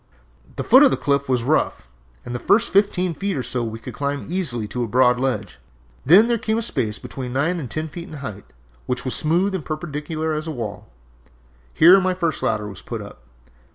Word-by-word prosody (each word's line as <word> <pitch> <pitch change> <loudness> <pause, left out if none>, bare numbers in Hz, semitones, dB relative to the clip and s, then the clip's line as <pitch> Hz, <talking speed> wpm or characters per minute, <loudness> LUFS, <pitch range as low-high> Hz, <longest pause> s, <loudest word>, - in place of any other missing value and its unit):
"The - - -3
foot 260 - +7
of 290 - +8
the - - 0
cliff 140 -1 0
was 125 -3 +1
rough, 140 - 0 0.4
and 120 - -6
the 120 - -3
first 215 - +2
fifteen 190 -3 +2
feet 195 +2 -3
or 130 - -2
so 125 0 -2
we 110 -1 -4
could 115 - -9
climb 140 0 -3
easily 150 - -2
to 125 +2 -2
a - - -2
broad 125 +2 +3
ledge, 120 -7 -2 0.4
then 190 - +7
there 235 -1 +1
came 220 -1 -1
a 230 - -1
space 120 - -2
between 125 -2 -7
nine 165 +7 0
and 135 -6 -6
ten 155 +7 -3
feet 170 +3 -8
in - - -9
height, 110 -9 -7 0.4
which 125 +1 -2
was 130 - -1
as - - +3
smooth 175 +6 +1
and 185 -5 -3
perpendicular 155 +1 -4
as 155 +1 -3
a - - -2
wall. 115 -8 -6 0.8
Here 180 +5 +7
my 185 0 0
first 170 -4 -1
ladder 105 -2 -1
was 100 -3 -9
put - - -6
up. - - -13
145 Hz, 220 wpm, -22 LUFS, 125-175 Hz, 0.8 s, of